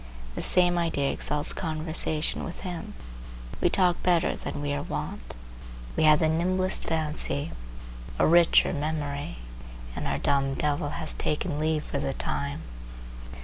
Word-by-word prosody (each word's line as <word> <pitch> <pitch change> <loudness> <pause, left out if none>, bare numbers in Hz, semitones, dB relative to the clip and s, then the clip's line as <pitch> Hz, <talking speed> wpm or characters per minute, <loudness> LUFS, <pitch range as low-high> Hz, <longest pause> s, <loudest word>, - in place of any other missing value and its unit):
The - - -4
same 175 -1 +4
idea 145 -5 0
exalts 150 0 +2
conversation 155 -1 -1
with 175 - -7
him. 175 -3 -6 0.7
We - - +4
talk 180 -2 +2
better 175 -2 +2
than - - -5
we 145 0 -2
are 145 - -1
wont. - - -5 0.6
We 155 - +3
have 155 0 +7
the 160 - +2
nimblest 185 +4 0
fancy, 155 -1 -1 0.7
a - - +4
richer 170 +1 +5
memory, 145 - -3 0.6
and - - -3
our - - 0
dumb 135 -1 +1
devil 145 0 0
has 160 -2 -2
taken 150 0 -2
leave 155 0 0
for - - -3
the 70 - -2
time. 70 0 -3
155 Hz, 145 wpm, -27 LUFS, 145-170 Hz, 0.7 s, have